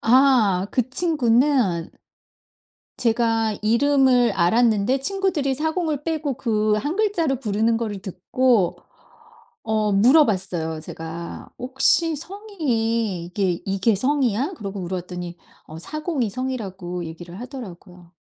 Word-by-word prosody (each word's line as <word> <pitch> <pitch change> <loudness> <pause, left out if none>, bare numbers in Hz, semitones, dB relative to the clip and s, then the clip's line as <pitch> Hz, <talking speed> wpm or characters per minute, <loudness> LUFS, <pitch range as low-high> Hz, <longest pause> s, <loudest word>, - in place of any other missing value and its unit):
아. 225 -7 +4
그 250 -1 0
친구는 255 - +2 1.1
제가 225 -2 +1
이름을 250 0 +3
알았는데 220 +6 +2
친구들이 350 -4 -1
사공을 315 0 -1
빼고 310 -4 -2
그 215 -4 +1
1 290 - -2
글자를 345 - +1
부르는 220 0 +1
거를 210 -4 -4
듣고 205 +1 +1 0.9
어 215 -2 0
물어봤어요 195 - +3
제가. 165 +2 -8
"혹시 270 +6 +2
성이 240 - -2
이게 180 -1 -1
이게 195 +3 +1
성이야?" 260 - 0
그러고 200 -2 -6
물어봤더니 180 -1 -5 0.3
어 155 - -9
사공이 305 - -3
성이라고 190 -8 -4
얘기를 170 +2 -9
하더라고요. 185 -9 -10
230 Hz, 255 characters per minute, -22 LUFS, 190-275 Hz, 1.1 s, 아